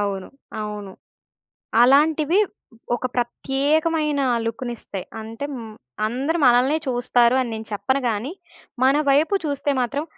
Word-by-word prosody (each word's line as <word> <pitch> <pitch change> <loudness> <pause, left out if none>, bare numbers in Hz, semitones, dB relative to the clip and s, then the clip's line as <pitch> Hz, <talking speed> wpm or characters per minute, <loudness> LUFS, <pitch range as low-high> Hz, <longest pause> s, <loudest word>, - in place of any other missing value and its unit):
అవును. 200 -2 -2 0.3
అవును. 210 -2 -6 0.9
అలాంటివి 305 +6 +4 0.6
ఒక 255 - -3
ప్రత్యేకమైన 290 +5 0 0.2
లుక్కునిస్తాయి. 230 -4 -5
అంటే, 225 +5 -7
హ్మ్, 225 -3 -8 0.3
అందరూ 275 +9 -1
మనల్నే 255 +6 +4
చూస్తారు 245 0 +3
అని 240 -3 -2
నేను 220 0 -7
చెప్పను 260 +6 0
గాని, 225 +9 -3 0.5
మన 270 +2 +5 0.2
వైపు 305 +8 +3
చూస్తే 285 0 -1
మాత్రం 285 +5 -2
255 Hz, 110 wpm, -22 LUFS, 230-290 Hz, 0.9 s, మన